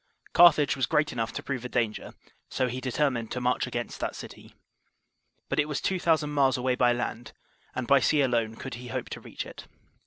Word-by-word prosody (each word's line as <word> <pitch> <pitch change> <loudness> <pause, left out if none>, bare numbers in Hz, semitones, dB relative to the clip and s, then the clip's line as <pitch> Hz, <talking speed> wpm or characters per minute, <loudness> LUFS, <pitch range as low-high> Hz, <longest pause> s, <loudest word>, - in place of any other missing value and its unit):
Carthage 155 -5 +6
was 130 -2 0
great 150 0 +2
enough 115 -2 -2
to - - -5
prove 130 -3 -4
a 125 - -5
danger, 115 -4 -2 0.3
so 130 - 0
he 125 +1 -4
determined 130 -3 0
to 125 - -3
march 125 +1 0
against 120 -1 -4
that - - -3
city. - - -11 0.9
But - - -1
it 150 - +2
was 150 - -1
two 190 -1 -1
thousand 160 -3 +2
miles 135 -3 +3
away 125 0 +1
by 125 -1 +3
land, 120 0 -4 0.4
and 130 - -2
by 140 +3 +5
sea 150 +1 +3
alone 115 -4 +1
could 130 +3 -7
he 125 +1 -8
hope 120 - -4
to - - -7
reach - - -7
it. - - -11
130 Hz, 210 wpm, -27 LUFS, 120-145 Hz, 0.9 s, Carthage